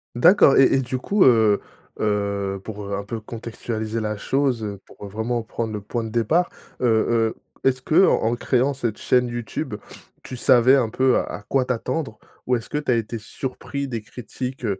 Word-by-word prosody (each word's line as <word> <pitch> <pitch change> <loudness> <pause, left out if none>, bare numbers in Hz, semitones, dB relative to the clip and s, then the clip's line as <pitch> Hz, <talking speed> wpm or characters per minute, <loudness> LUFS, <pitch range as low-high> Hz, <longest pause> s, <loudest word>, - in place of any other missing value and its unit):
D'accord 160 +2 +6
et 135 - +6
et - - +3
du 130 0 -3
coup, 200 +9 +2
heu, 110 -5 +5 0.4
heu, 100 -2 -1
pour 100 -1 -6
un 100 - -4
peu 110 +3 -5
contextualiser 110 0 -5
la 105 -1 -2
chose, 130 +1 0
heu, 100 -2 -5
pour 100 - -11
vraiment 110 +4 -2
prendre 115 0 -4
le 105 - -4
point 115 +3 -3
de 110 - -5
départ. 120 - +1 0.3
Heu, - - +1
heu, 115 0 +2 0.3
est-ce 130 -1 +2
qu'en 130 -6 +3
créant 130 +3 +1
cette 115 -5 -3
chaîne 125 -1 +2
YouTube 120 -2 -4 0.5
tu 130 - -8
savais 125 +2 +5
un 125 -5 +2
peu 130 +2 +2
à - - +1
à - - -7
quoi 130 +5 0
t'attendre? 125 0 -3 0.3
Ou 125 - +2
est-ce 115 - -5
que - - -2
tu 150 -3 -1
as - - +4
été 115 0 -2
surpris 135 +5 -5
des 115 -4 -4
critiques, 125 +2 -6
heu, 100 -3 -1
115 Hz, 190 wpm, -23 LUFS, 110-130 Hz, 0.5 s, D'accord